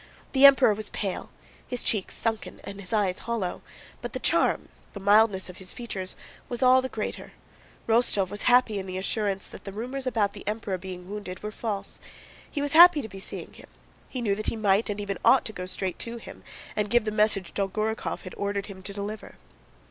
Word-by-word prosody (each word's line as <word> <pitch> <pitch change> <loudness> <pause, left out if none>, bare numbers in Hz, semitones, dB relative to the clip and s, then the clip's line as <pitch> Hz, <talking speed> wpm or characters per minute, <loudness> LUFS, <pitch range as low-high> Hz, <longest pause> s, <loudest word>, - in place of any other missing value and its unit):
The 275 0 +9
Emperor 270 -5 +6
was 210 0 -1
pale, 195 -3 -4 0.4
his 245 -1 -2
cheeks 205 -4 +1
sunken 225 -1 -1
and 200 0 -8
his 185 - -3
eyes 205 -4 +1
hollow, 225 -6 -3 0.4
but - - -6
the - - -3
charm, - - +2 0.2
the 200 - -7
mildness 205 -1 +4
of 180 0 -10
his 185 -1 -6
features, 195 -6 -5 0.3
was 240 0 -1
all 255 +1 +6
the 260 - -4
greater. 215 - -5 0.5
Rostóv 225 -5 +3
was 205 - -3
happy 245 -4 +4
in 190 - -6
the 185 0 -4
assurance 195 0 -1
that - - -11
the 195 - -6
rumors 255 +6 -4
about 215 -5 +1
the 205 - -9
Emperor 210 -3 -2
being 180 -1 -8
wounded 200 -2 -7
were 210 - -4
false. 210 -2 -4 0.5
He 285 - -2
was 290 - 0
happy 335 -2 +9
to 220 - -7
be 195 0 -9
seeing - - -5
him. - - -14 0.4
He 255 - -4
knew 210 -4 +1
that 215 +2 -4
he - - 0
might 210 0 +2
and 205 0 -3
even 200 -1 -3
ought 260 - +5
to 220 - -3
go 180 -2 -6
straight 185 -1 -2
to 235 0 -3
him - - -11 0.3
and 210 -1 0
give 240 0 +3
the 215 - -1
message 210 -4 +1
Dolgorúkov 215 +3 -2
had 185 - -8
ordered 200 0 -1
him 190 -2 -10
to 200 +1 -5
deliver. 205 +2 -6
210 Hz, 210 wpm, -27 LUFS, 195-230 Hz, 0.5 s, The